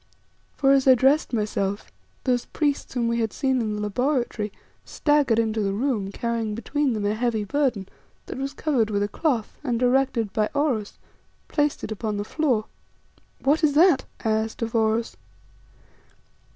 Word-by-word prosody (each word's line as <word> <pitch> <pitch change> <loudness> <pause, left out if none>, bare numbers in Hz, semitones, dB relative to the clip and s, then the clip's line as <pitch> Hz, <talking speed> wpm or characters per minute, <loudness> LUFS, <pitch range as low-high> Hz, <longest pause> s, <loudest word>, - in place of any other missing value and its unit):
For 275 -1 +3
as 275 -1 +4
I 260 - +8
dressed 270 +6 +3
myself, 205 - -2 0.3
those 250 -2 +1
priests 290 -3 -2
whom 235 -2 +1
we 235 0 0
had 225 -2 0
seen 265 -2 0
in 215 -2 -2
the 210 - -4
laboratory, 240 -1 -1 0.3
staggered 290 -6 +2
into 220 -1 +1
the 195 -1 0
room 220 -5 -1
carrying 230 -1 -2
between 280 +3 -1
them 210 -2 -2
a 205 - +1
heavy 225 -1 0
burden, 245 -5 0 0.4
that - - -7
was 275 +1 -4
covered 255 -9 +1
with 205 -1 0
a - - 0
cloth, 240 -1 -2
and, 245 -5 0
directed 250 -4 +1
by 215 -1 +1
Oros, 260 -8 0 0.5
placed 295 -1 0
it - - -5
upon 215 -1 -3
the 205 - -2
floor. 245 -3 0 0.8
"What 300 +4 +2
is 295 -2 +4
that?" 335 -2 +5 0.2
I 220 - +2
asked 220 +1 -1
of 230 - -3
Oros. 225 0 +1
235 Hz, 165 wpm, -24 LUFS, 215-275 Hz, 0.8 s, I